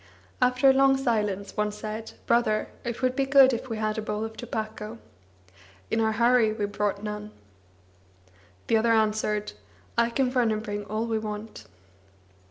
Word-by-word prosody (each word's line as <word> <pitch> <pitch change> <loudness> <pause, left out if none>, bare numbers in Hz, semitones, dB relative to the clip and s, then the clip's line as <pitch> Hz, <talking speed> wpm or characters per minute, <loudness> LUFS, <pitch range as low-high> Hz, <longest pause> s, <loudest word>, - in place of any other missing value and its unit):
After 250 +2 +4
a 265 - +8
long 270 0 +4
silence, 210 -6 -1
one 210 0 0
said: 215 +1 -6
"Brother, 235 -2 +2
it 240 +2 -5
would 255 0 +2
be 270 0 0
good 270 -1 +7
if 240 +2 -4
we 225 - -3
had 215 0 -1
a - - -2
bowl 210 0 -3
of 220 0 -8
tobacco. 220 -1 -5 0.9
In 225 - +2
our 220 0 +2
hurry 235 0 +4
we 215 -1 -2
brought 205 0 -2
none." 210 0 -5 1.4
The 225 - +3
other 230 +1 +3
answered: 215 -1 +1 0.5
"I 235 0 +3
can 250 +1 0
run 245 -3 +2
and 215 0 -1
bring 205 -1 -4
all 215 +2 -2
we 225 -1 -1
want." 210 - -7
220 Hz, 170 wpm, -26 LUFS, 210-240 Hz, 1.4 s, a